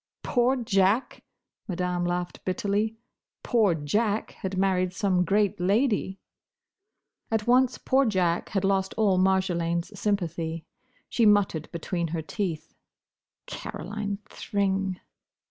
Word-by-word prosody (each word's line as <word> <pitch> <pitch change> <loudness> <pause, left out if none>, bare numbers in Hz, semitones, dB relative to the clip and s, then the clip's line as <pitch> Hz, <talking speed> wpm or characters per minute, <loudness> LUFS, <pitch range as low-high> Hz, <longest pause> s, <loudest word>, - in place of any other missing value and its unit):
"Poor 245 +2 +2
Jack!" 215 -1 +1 0.5
Madame 180 -2 -1
laughed 175 0 -3
bitterly. 205 +4 -1 0.5
"Poor 215 -8 +3
Jack 205 +8 0
had 190 0 -5
married 185 -1 +1
some 185 -2 +1
great 200 +1 +1
lady!" 200 0 +1 1.1
At 220 -2 0
once 250 +1 +4
poor 270 +1 +2
Jack 180 -5 +1
had 195 -2 -1
lost 195 -1 +1
all 200 -4 +3
Marjolaine's 185 0 0
sympathy. 165 -5 -2 0.4
She 230 -3 +3
muttered 200 -7 +2
between 170 +1 -2
her 160 0 -3
teeth, 175 -3 -4 0.7
"Caroline 205 0 -5
Thring." 195 -3 -1
195 Hz, 110 wpm, -27 LUFS, 180-210 Hz, 1.1 s, once